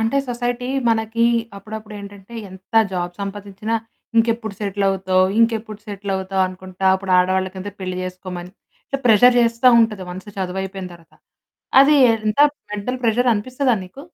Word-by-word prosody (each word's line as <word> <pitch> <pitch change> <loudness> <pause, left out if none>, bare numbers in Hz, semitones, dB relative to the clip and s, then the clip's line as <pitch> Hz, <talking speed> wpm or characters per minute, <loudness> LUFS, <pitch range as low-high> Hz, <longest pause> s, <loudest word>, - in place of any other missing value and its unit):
అంటే 225 +5 +1
సొసైటీ 245 +1 -2 0.2
మనకి 225 0 +1 0.3
అప్పుడప్పుడేంటంటే, 205 0 -9 0.2
ఎంత 190 +4 -14 0.2
జాబ్ 175 -1 -2
సంపాదించినా, 200 +2 -4 0.4
"ఇంకెప్పుడు 225 -2 +1
సెటిలవుతావు, 195 -2 +1
ఇంకెప్పుడు 225 -2 +1
సెటిలవుతావు" 195 -2 -2
అనుకుంటా, 185 +1 -5
అప్పుడు 190 0 -3
ఆడవాళ్ళకంతే 190 +2 0
పెళ్లి 185 -1 -4
చేసుకోమని 180 0 -7 0.4
సో, - - +2
ప్రెషర్ 245 +2 +6
చేస్తా 230 +1 +2
ఉంటది, 215 -4 +1
వన్స్ 190 +3 -8
చదువైపోయిన 190 0 -4
తర్వాత. 165 -1 -20 0.7
అది 290 +2 +6 0.2
ఎంత 215 +1 -2 0.3
మెంటల్ 210 +5 -3
ప్రెషరనిపిస్తదా 245 +3 +1
నీకు? 185 +9 -12
205 Hz, 120 wpm, -20 LUFS, 190-230 Hz, 0.7 s, ప్రెషర్